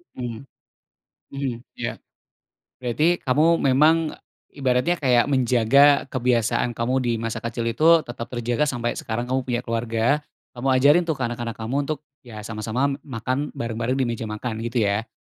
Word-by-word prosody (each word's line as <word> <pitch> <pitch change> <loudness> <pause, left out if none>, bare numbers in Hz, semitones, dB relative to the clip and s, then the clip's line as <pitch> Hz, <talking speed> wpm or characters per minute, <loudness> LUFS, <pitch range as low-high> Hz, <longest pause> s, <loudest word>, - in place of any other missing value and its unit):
Mhm, 120 -3 -5 0.9
mhm, 135 -3 -2 0.2
iya. - - -4 0.8
Berarti 150 +8 +2
kamu 135 +4 +3 0.2
memang, 145 +4 +5 0.6
ibaratnya 135 +5 +1
kayak 125 -3 +3
menjaga 135 +2 +4
kebiasaan 120 -2 +1
kamu 120 +2 -1
di 120 - +1
masa 115 0 -3
kecil 115 0 -3
itu 160 +8 +5
tetap 120 -1 -6
terjaga 120 +3 0
sampai 120 -3 -2
sekarang 120 +2 -4
kamu 130 +1 +1
punya 120 -1 -1
keluarga. 115 -1 -2 0.5
Kamu 125 +3 -2
ajarin 145 +7 +5
tuh 160 -3 -1
ke 135 - -5
anak-anak 120 -1 -4
kamu 115 +4 -3
untuk, 155 0 -3 0.3
iya 110 -3 -9
sama-sama 110 +5 -2 0.2
makan 130 +2 -3
bareng-bareng 115 +2 -2
di - - +3
meja 115 -1 -3
makan 110 +1 -4
gitu 120 +1 -1
ya? 100 +3 0
120 Hz, 150 wpm, -23 LUFS, 115-135 Hz, 0.9 s, memang